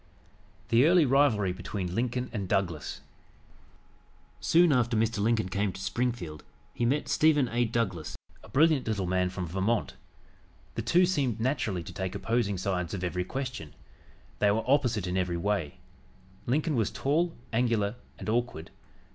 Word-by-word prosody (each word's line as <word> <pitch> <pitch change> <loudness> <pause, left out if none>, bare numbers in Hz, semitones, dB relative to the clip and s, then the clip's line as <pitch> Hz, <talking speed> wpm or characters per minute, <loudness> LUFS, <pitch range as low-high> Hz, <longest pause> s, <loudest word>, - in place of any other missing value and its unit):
THE 115 +2 +5
EARLY 175 -2 +5
RIVALRY 125 -9 +3
BETWEEN 90 -1 -4
LINCOLN 125 +3 -1
AND 100 -5 -3
DOUGLAS 85 -6 -1 1.4
Soon 170 -2 +4
after 120 -2 +2
Mr. 115 0 +1
Lincoln 110 -1 +1
came 100 +2 -1
to - - -10
Springfield 95 -7 -3 0.3
he 120 - 0
met 145 +4 0
Stephen 150 -4 +3
A. 120 +1 +1
Douglas, 110 -8 -2 0.2
a - - -15
brilliant 150 -2 +3
little 105 -4 -1
man 90 0 +1
from 90 0 -4
Vermont. 95 +6 -1 0.8
The - - -3
two 180 +2 +4
seemed 140 - 0
naturally 110 - -1
to - - -9
take 95 -2 -4
opposing 115 -4 0
sides 90 0 -2
of 95 - -5
every 90 0 -1
question. 125 - -5 0.6
They 105 - +4
were 110 +2 +1
opposite 125 -8 +2
in 90 0 -2
every 90 -2 0
way. 90 -5 -1 0.7
Lincoln 150 +4 +1
was 115 -4 +1
tall, 165 +5 0 0.2
angular 115 -3 +1 0.2
and - - -8
awkward. 115 -8 -2
110 Hz, 150 wpm, -29 LUFS, 95-125 Hz, 1.4 s, THE